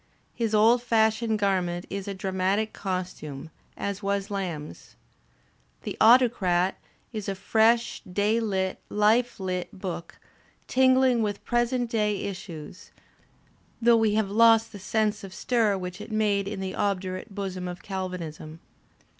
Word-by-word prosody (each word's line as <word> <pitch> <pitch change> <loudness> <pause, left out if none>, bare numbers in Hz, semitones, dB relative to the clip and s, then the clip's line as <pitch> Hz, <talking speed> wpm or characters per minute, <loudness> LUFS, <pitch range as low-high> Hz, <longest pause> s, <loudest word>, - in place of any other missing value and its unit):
His 225 -3 -1
old 230 +3 +5
fashioned 220 -1 +2
garment 185 -3 0
is 200 0 -4
a 200 - -4
dramatic 190 +3 -1
costume, 180 -6 -5 0.3
as 200 0 -3
was 200 0 -2
Lamb's. 170 - -5 0.9
"The - - -4
Autocrat" 215 -7 +4 0.3
is 210 -3 -4
a 195 - -2
fresh, 225 +4 +2
day 210 +4 +2
lit, 190 -4 -1
life 220 +4 +2
lit 185 -1 -3
book, 185 -3 -6 0.5
tingling 260 -2 +4
with 205 -2 -3
present 240 +1 +1
day 210 -3 0
issues, 180 -2 -8 0.9
though 235 0 +5
we 220 -2 +2
have 215 -3 0
lost 225 +1 +5
the 205 - -9
sense 210 +1 0
of 190 -1 -9
stir 225 -5 +1
which 180 +1 -6
it 215 - -9
made 205 -2 +1
in 200 -1 -4
the 190 0 -3
obdurate 195 0 -2
bosom 190 -3 -4
of 180 0 -7
Galvanism. 175 -5 -6
200 Hz, 135 wpm, -26 LUFS, 185-220 Hz, 0.9 s, old